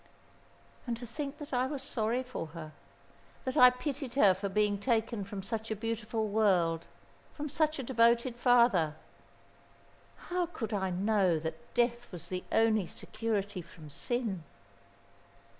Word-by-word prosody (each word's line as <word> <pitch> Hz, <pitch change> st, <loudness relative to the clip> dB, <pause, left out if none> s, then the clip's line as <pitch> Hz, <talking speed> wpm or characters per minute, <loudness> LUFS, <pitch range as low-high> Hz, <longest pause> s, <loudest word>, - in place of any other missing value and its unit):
"And 235 Hz, -1 st, -1 dB
to 240 Hz, -, -7 dB
think 280 Hz, +4 st, -5 dB
that 295 Hz, -2 st, -8 dB
I 250 Hz, +1 st, +2 dB
was 275 Hz, -1 st, -4 dB
sorry 235 Hz, 0 st, 0 dB
for 250 Hz, -10 st, -5 dB
her, 155 Hz, -2 st, -7 dB, 0.7 s
that 260 Hz, -, -2 dB
I 250 Hz, -, +9 dB
pitied 260 Hz, 0 st, -4 dB
her 205 Hz, -9 st, +6 dB
for 195 Hz, +2 st, -4 dB
being 205 Hz, 0 st, +1 dB
taken 225 Hz, -1 st, 0 dB
from 195 Hz, 0 st, -6 dB
such 225 Hz, +2 st, -3 dB
a 220 Hz, -, -1 dB
beautiful 225 Hz, 0 st, -2 dB
world, 185 Hz, -6 st, +2 dB, 0.5 s
from 300 Hz, 0 st, -4 dB
such 310 Hz, +1 st, +1 dB
a 270 Hz, -, -3 dB
devoted 235 Hz, 0 st, +3 dB
father. 235 Hz, -, +4 dB, 1.4 s
How 355 Hz, -1 st, +1 dB
could 235 Hz, -10 st, -5 dB
I 190 Hz, -2 st, 0 dB
know 190 Hz, -1 st, +2 dB
that 160 Hz, +1 st, -6 dB
Death 240 Hz, 0 st, +1 dB
was 175 Hz, -3 st, -7 dB
the 185 Hz, -1 st, -3 dB
only 220 Hz, -4 st, +3 dB
security 205 Hz, -3 st, -3 dB
from 160 Hz, -3 st, -13 dB
sin?" 225 Hz, -, -2 dB
225 Hz, 145 wpm, -31 LUFS, 195-250 Hz, 1.4 s, I